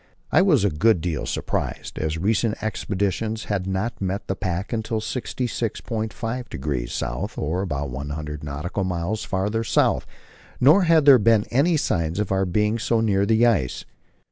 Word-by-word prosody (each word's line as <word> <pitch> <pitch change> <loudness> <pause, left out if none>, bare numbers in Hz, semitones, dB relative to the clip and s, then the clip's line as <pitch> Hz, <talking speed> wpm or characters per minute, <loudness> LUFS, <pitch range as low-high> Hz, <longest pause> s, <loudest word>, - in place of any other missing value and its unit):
I - - +5
was 155 - +4
a 100 - +2
good 100 +6 +3
deal 80 -2 -3
surprised, - - -3
as 80 +1 -1
recent 105 +4 +1
expeditions 110 +1 -2
had 95 -3 -2
not 95 +5 -2
met 95 +1 -2
the 95 - -2
pack 95 +4 -3
until 110 0 -1
66.5° 115 - -3 0.5
S., - - -20
or 80 +5 -1
about 70 -7 -3
one 70 +3 -5
hundred 75 0 -5
nautical 75 +7 -3
miles 95 +4 -2
farther 105 +4 -1
south, 110 - +2 0.5
nor 160 +9 +6
had 165 -3 +4
there 135 -3 +8
been 110 0 +4
any 150 +7 +3
sign 85 - -1
of 105 -2 -1
our 95 0 +2
being 105 +5 +1
so 115 -1 +1
near 100 -3 +2
the 110 +2 +4
ice. 100 - +1
100 Hz, 160 wpm, -23 LUFS, 85-115 Hz, 0.5 s, there